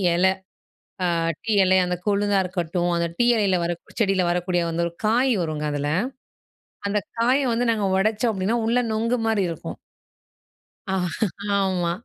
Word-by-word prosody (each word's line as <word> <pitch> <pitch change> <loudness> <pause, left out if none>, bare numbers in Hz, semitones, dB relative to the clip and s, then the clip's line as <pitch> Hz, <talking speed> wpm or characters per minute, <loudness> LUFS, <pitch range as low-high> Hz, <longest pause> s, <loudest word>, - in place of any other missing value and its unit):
இலை, 190 +2 +4 0.7
ஆ - - +2 0.4
டீ 225 - -2
இலை 190 0 +4
அந்த 180 - -1
கொழுந்தா 205 0 +2
இருக்கட்டும், 175 -1 -2
அந்த 170 0 0
டீ 240 - +3
இலையில 200 -4 +2
வர 170 - 0 0.3
செடியில 195 -4 +2
வரக்கூடிய 175 0 0
வந்து 165 +1 -1
ஒரு 170 - -9
காய் 245 +4 +3
வருங்க 155 -2 -3
அதில, 145 0 -2 1.0
அந்த 205 +1 +1 0.2
காயை 255 +4 +3
வந்து 235 +1 0
நாங்க 215 -3 0
உடைச்சோம் 215 +3 +1
அப்படின்னா 200 +4 0
உள்ள 235 +2 +2
நொங்கு 230 +3 0
மாரி 215 -4 +2
இருக்கும். 165 - -7 1.2
ஆமா. 190 -1 -1
195 Hz, 145 wpm, -23 LUFS, 175-220 Hz, 1.2 s, இலை